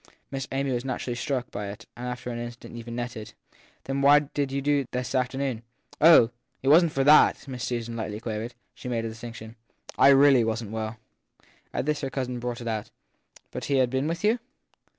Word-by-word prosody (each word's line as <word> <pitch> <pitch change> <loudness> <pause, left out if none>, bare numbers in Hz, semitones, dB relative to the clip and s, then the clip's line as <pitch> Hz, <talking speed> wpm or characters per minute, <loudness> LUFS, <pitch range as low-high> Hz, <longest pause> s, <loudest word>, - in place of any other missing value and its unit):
Miss 135 -1 -4
Amy 135 0 -1
was 120 -1 -1
naturally 130 -1 -3
struck 125 0 -3
by 105 - -4
it 105 +3 -8
and 125 +1 -6
after 125 0 -5
an 120 - -4
instant 120 0 -8
even 120 0 -7
nettled. 120 -3 -6 0.2
{ - - -31
Then 135 +1 -2
why 140 +1 +7
did 145 -1 -1
you 140 - -1
do 145 +1 +2
so 135 - -8
this 125 +1 -3
afternoon? 130 -2 -1 0.4
1 160 - +7
Oh, 120 -7 +7 0.3
it 135 - +2
wasn 165 +3 +7
t - - -14
for 135 - +2
that! 150 0 +5
Miss 125 -2 -5
Susan 120 -2 -3
lightly 110 -2 -4
quavered. 115 +1 -5 0.2
She 125 - -8
made 115 -2 -1
her 115 - -3
distinction. 115 0 -9 0.4
I - - +7
really 135 -2 +7
wasn 110 -1 -2
t - - -8
well. 110 +1 -4 0.7
At - - -2
this 150 0 0
her 135 - -2
cousin 125 -2 -3
brought 120 0 -4
it 120 - -6
out. 110 -2 -3 0.6
But - - -5
he 140 - 0
has 130 -2 +3
been 130 +3 -1
with 170 +4 -3
you? 220 +3 +3
125 Hz, 220 wpm, -26 LUFS, 115-140 Hz, 0.7 s, why